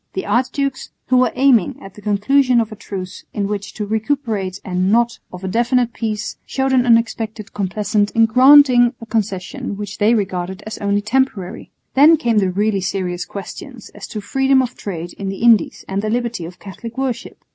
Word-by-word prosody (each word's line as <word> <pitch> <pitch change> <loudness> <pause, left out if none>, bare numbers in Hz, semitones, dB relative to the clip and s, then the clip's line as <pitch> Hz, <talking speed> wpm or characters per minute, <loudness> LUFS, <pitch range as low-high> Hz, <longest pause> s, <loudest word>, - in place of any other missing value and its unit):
The 190 - -3
archdukes, 260 +4 -1 0.2
who 255 - +4
were 250 -2 +3
aiming 255 -7 +3
at 195 - -12
the 210 - -14
conclusion 245 +5 +2
of 225 -2 -1
a - - -7
truce 185 -2 -7
in 205 - -1
which 205 0 -4
to 210 - -3
recuperate 220 -4 -2
and 185 +1 0
not 235 +1 +2
of 180 +1 -10
a - - -3
definitive 240 +3 +1
peace, 215 -2 -4
showed 265 0 -1
an 250 -1 +3
unexpected 225 -2 0
complaisance 205 +1 0
in 230 -1 +4
granting 250 0 +6
a 230 - -9
concession 220 +2 -3
which 205 -1 -7
they 220 +3 +4
regarded 190 -1 -3
as 215 -1 -6
only 205 0 0
temporary. 210 -5 -1 0.2
Then 305 +4 +6
came 230 -5 +1
the 190 -2 +1
really 200 +1 0
serious 180 -2 -3
questions 235 - -9
as - - -10
to 210 - -6
freedom 265 +5 +2
of 250 0 -5
trade 175 -3 -6
in 195 -1 -3
the 195 +3 -5
Indies 230 -6 +3
and 195 +1 -2
the 215 - -2
liberty 235 -5 -2
of 175 +2 -10
Catholic 225 +4 -9
worship. 265 -3 -3
215 Hz, 190 wpm, -19 LUFS, 195-245 Hz, 0.2 s, granting